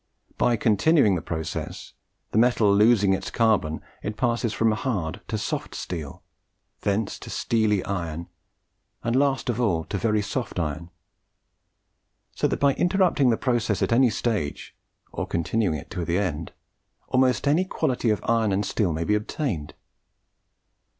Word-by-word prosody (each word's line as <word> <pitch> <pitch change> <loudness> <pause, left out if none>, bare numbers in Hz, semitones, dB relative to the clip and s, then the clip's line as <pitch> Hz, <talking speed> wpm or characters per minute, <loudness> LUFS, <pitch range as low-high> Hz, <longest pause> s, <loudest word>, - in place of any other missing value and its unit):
By 120 - +3
continuing 110 - +3
the 85 - -1
process, 80 -1 -5 0.4
the 110 - +2
metal 115 -4 +4
losing 105 -2 +5
its 95 - -2
carbon, 105 -9 +1 0.2
it 105 +1 -5
passes 120 -2 0
from 115 +2 +2
hard 105 - -2
to 110 - -2
soft 105 - -4
steel, 80 -6 -6 0.6
thence 100 +1 -1
to - - -10
steely 110 -4 +1
iron, 85 -4 -3 0.8
and 115 +1 0
last 135 0 +2
of 120 0 0
all 90 -9 +1
to 100 - -4
very 105 +1 +1
soft 110 +1 -4
iron; 80 0 -3 1.4
so - - +1
that - - -2
by 140 -1 +4
interrupting 175 -7 +2
the 115 - +2
process 120 -5 0
at - - 0
any 125 +1 +5
stage, 105 -8 -2 0.4
or - - -4
continuing 85 0 0
it 70 - -11
to 90 -4 -3
the 85 +1 0
end, 85 -6 -2 0.6
almost 130 +1 +2
any 155 +6 +4
quality 125 -9 -1
of 105 - 0
iron 115 -2 +2
and 100 +2 0
steel 95 -7 0
may 80 +2 -2
be 105 - +1
obtained. 105 - -2
105 Hz, 150 wpm, -25 LUFS, 90-120 Hz, 1.4 s, losing